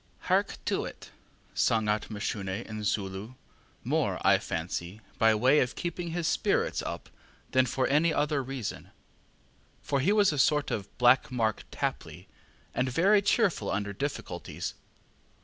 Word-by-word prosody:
ŌĆ£ŌĆśHark - - +1
to - - 0
it! - - -10 0.4
ŌĆÖ - - -18
sung 110 -2 +2
out 105 +1 0
Mashune 100 -1 -3
in 110 -1 -6
Zulu, 100 +3 -2 0.5
more, - - 0
I - - +6
fancy, 85 +4 -4 0.2
by 110 -1 +5
way 130 +7 +4
of 125 0 0
keeping 175 0 -4
his 165 0 -2
spirits - - +1
up - - -5 0.4
than 130 0 +4
for 130 +2 0
any 155 +4 +3
other 150 -1 +1
reason 130 -4 -5 0.9
for 140 - 0
he 170 +9 +2
was 205 -5 +4
a 145 - -2
sort 150 +1 +3
of 100 -2 -5
black 125 +2 +4
Mark 115 -4 0
Tapley, - - -4 0.5
and 125 +1 0
very 195 +10 +4
cheerful 200 - +1
under 100 0 -2
difficulties. 100 -7 -4
125 Hz, 150 wpm, -29 LUFS, 105-150 Hz, 0.9 s, I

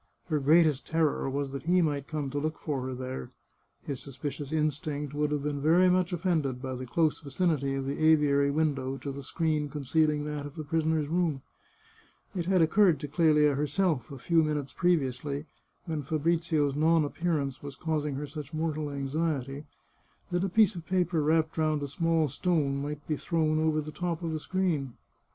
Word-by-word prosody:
Her 155 -2 +1
greatest 150 0 +4
terror 160 -4 +1
was 140 0 -2
that 140 +4 -7
he 180 +1 +4
might 145 -5 0
come 150 -4 -3
to 145 - -1
look 155 +2 -2
for 135 -4 -3
her 130 - -4
there. 130 0 -5 0.5
His 140 -4 -4
suspicious 140 +1 -6
instinct 150 -2 -1
would 150 0 0
have 150 -1 -1
been 145 -1 -2
very 175 +5 +5
much 180 0 +2
offended 160 -7 0
by 130 0 -4
the 130 0 -6
dose 160 +3 +1
vicinity 140 -2 0
of 135 -1 -3
the 140 +3 -2
aviary 145 -3 +4
window 140 -3 0
to 140 +2 -5
the 140 +1 -7
screen 155 0 -1
concealing 150 +1 +1
that 150 -1 -4
of 145 - -13
the 155 - -5
prisoner's 160 0 0
room. 160 -4 0 0.9
It 175 -2 -2
had 185 -3 +4
occurred 175 -2 +4
to 145 - -3
Clelia 150 -1 +4
herself, 150 - 0
a 140 - -7
few 165 +5 +2
minutes 150 -3 -2
previously, 145 -4 0 0.4
when 160 -4 -2
Fabrizio's 155 -1 +1
non 160 +1 +3
appearance 145 -4 -2
was 140 -1 -7
causing 150 -2 -2
her 145 +2 -3
such 150 +1 -7
mortal 155 -2 -1
anxiety, 140 0 -2 0.7
that 175 +1 +1
a 195 - 0
piece 215 +2 +4
of 170 -3 -7
paper 175 -2 +1
wrapped 160 +1 +1
round 155 -2 +1
a - - -2
small 165 +2 +1
stone 145 -2 0
might 145 +1 -5
be 155 - -1
thrown 155 -1 +1
over 155 -1 +2
the 155 +1 -7
top 175 +1 -3
of 165 - -2
the 155 - -2
screen. 160 -8 -1
150 Hz, 185 wpm, -29 LUFS, 140-165 Hz, 0.9 s, very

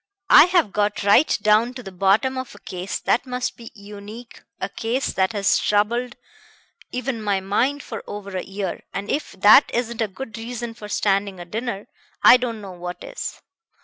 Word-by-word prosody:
I - - +10
have 350 - +2
got 205 0 0
right 205 +9 +4
down 220 +4 +3
to 250 - -8
the 195 - -8
bottom 200 +8 +2
of 260 -4 -6
a - - -14
case 185 -1 -5
that 245 - 0
must 250 0 -3
be 230 -1 -11
unique, 210 +3 -11 0.2
a - - -2
case 235 +6 -2
that 190 -1 +1
has 200 -2 +2
troubled 235 +4 0 0.8
even 250 -2 -3
my 200 -2 0
mind 245 +9 0
for 225 - -7
over 200 -1 -7
a 185 - -1
year, 195 -1 -5
and 200 +1 -3
if 300 - -3
that 205 +8 +6
isn't 235 -1 -2
a 220 - +1
good 225 +3 -8
reason 235 0 -5
for 210 -2 -10
standing 200 -2 0
a 175 - -7
dinner, 210 +1 -4 0.4
I - - +9
don't 235 -3 -4
know 195 -2 -8
what 175 0 -7
is. - - -7
210 Hz, 185 wpm, -22 LUFS, 200-245 Hz, 0.8 s, I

